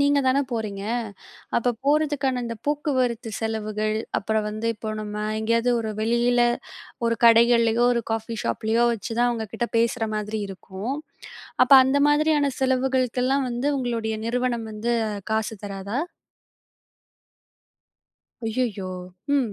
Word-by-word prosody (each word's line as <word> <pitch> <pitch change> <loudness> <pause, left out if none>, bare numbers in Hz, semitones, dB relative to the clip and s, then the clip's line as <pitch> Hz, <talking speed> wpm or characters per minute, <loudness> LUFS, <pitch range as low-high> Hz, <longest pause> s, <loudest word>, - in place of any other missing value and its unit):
நீங்கதான 280 -1 +3
போறீங்க. 215 -4 -3 0.7
அப்பப் 235 -1 0
போறதுக்கான 285 -3 +1
அந்தப் 230 -1 -6
போக்குவரத்து 255 -6 0
செலவுகள், 215 -1 -2 0.2
அப்புறம் 220 +1 -1
வந்து 215 +2 -4
இப்ப 215 0 -5
நம்ம 210 0 -4 0.2
எங்கேயாவது 230 +2 +2
ஒரு 220 -1 -3
வெளியில 240 +2 +2 0.6
ஒரு 230 0 +1
கடைகள்லயோ, 235 0 +5
ஒரு 235 - 0
காஃபி 225 +1 -3
ஷாப்லயோ, 225 +2 +1
வச்சுதான் 235 +3 0
அவங்ககிட்ட 225 +1 -3
பேசுற 230 0 +1
மாதிரி 210 +1 -3
இருக்கும். 195 +6 -5 0.7
அப்ப - - -6
அந்த 270 +2 +2
மாதிரியான 295 -1 +3
செலவுகளுக்கல்லாம் 260 0 +1
வந்து 245 +4 -2
உங்களுடைய 230 -3 -2
நிறுவனம் 240 -1 -1
வந்து 225 +3 -1 0.4
காசு 220 0 0
தராதா? 200 +5 -4 2.5
ஐயையோ! 220 -5 -2 0.5
ம். 245 -6 0
235 Hz, 110 wpm, -24 LUFS, 220-255 Hz, 2.5 s, கடைகள்லயோ